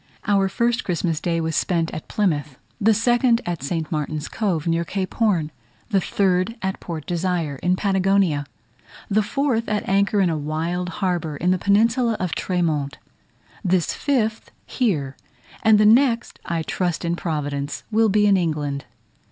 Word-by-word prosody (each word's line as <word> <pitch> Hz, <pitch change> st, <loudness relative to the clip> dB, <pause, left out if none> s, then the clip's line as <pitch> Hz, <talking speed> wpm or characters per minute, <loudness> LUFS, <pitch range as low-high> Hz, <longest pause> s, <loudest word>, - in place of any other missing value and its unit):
Our 195 Hz, -2 st, +2 dB
first 235 Hz, +5 st, 0 dB
Christmas 170 Hz, -3 st, -1 dB
Day 170 Hz, -1 st, 0 dB
was 160 Hz, -1 st, -2 dB
spent 170 Hz, -3 st, 0 dB
at 155 Hz, -, -6 dB
Plymouth, 150 Hz, -9 st, -1 dB, 0.2 s
the 220 Hz, +1 st, +4 dB
second 240 Hz, +1 st, +3 dB
at 175 Hz, -3 st, -3 dB
St. 160 Hz, +3 st, -3 dB
Martin's 155 Hz, -1 st, -2 dB
Cove, 185 Hz, -8 st, -1 dB
near 165 Hz, 0 st, +1 dB
Cape 185 Hz, +2 st, -3 dB
Horn; 180 Hz, -9 st, +1 dB, 0.4 s
the 195 Hz, -2 st, +3 dB
third 185 Hz, +3 st, +1 dB
at 190 Hz, 0 st, -2 dB
Port 160 Hz, -4 st, -6 dB
Desire, 175 Hz, -4 st, -1 dB
in 180 Hz, +6 st, +1 dB
Patagonia; 190 Hz, -6 st, +1 dB, 0.6 s
the 215 Hz, +2 st, +4 dB
fourth 230 Hz, +1 st, -1 dB
at 210 Hz, -1 st, -1 dB
anchor 200 Hz, +1 st, +2 dB
in 185 Hz, -3 st, +3 dB
a 160 Hz, -, -1 dB
wild 165 Hz, +4 st, -2 dB, 0.2 s
harbour 170 Hz, -5 st, -1 dB
in 180 Hz, +4 st, +1 dB
the 185 Hz, -, +1 dB
peninsula 230 Hz, +4 st, +2 dB
of 180 Hz, -2 st, -2 dB
Tres 180 Hz, -2 st, -1 dB
Montes, 145 Hz, -4 st, -1 dB, 0.7 s
this 185 Hz, -3 st, +1 dB
fifth 225 Hz, -6 st, -1 dB, 0.2 s
here, 150 Hz, -, -1 dB, 0.5 s
and 220 Hz, -1 st, +5 dB
the 210 Hz, -, +5 dB
next, 235 Hz, +1 st, +3 dB
I 165 Hz, -1 st, -2 dB
trust 175 Hz, +1 st, -2 dB
in 170 Hz, 0 st, 0 dB
Providence, 145 Hz, -4 st, -3 dB
will 220 Hz, 0 st, +3 dB
be 210 Hz, +1 st, +3 dB
in 200 Hz, -1 st, +5 dB
England. 145 Hz, -5 st, -2 dB
180 Hz, 160 wpm, -22 LUFS, 160-210 Hz, 0.7 s, and